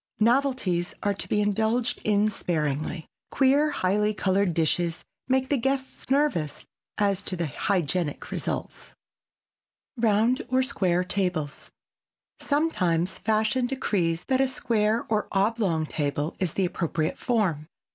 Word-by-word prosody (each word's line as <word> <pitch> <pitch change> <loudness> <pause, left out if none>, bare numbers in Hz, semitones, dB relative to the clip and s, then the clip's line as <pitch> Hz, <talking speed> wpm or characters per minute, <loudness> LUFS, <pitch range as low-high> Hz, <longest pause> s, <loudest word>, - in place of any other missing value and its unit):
Novelties 230 -7 +1
are 205 - +2
to 195 - -5
be 210 - +2
indulged 220 +4 0
in 210 0 +3
sparingly. 155 -4 -2 0.2
Queer 280 +3 +3
highly 210 -3 +1
colored 195 -1 +1
dishes 165 +1 0 0.2
make 260 0 +1
the 285 - +2
guests 265 +1 -2
nervous 270 - 0 0.3
as 200 -2 +1
to 195 - -2
the 170 -1 -1
hygienic 170 +1 -1
results. - - -4 1.0
[Sidenote: 225 -4 +2
ROUND 235 +5 +2
OR 260 0 +3
SQUARE 185 -9 +1
TABLES] 180 -6 -2 0.7
Sometimes 190 - 0
fashion 220 +3 +1
decrees 185 -11 -1
that 260 0 +2
a 270 - +3
square 230 -3 0
or 215 -1 0
oblong 195 -5 +1
table 145 +1 -2
is 180 -5 0
the 190 - +1
appropriate 165 -3 -2
form. 185 -11 0
205 Hz, 125 wpm, -26 LUFS, 175-245 Hz, 1.0 s, in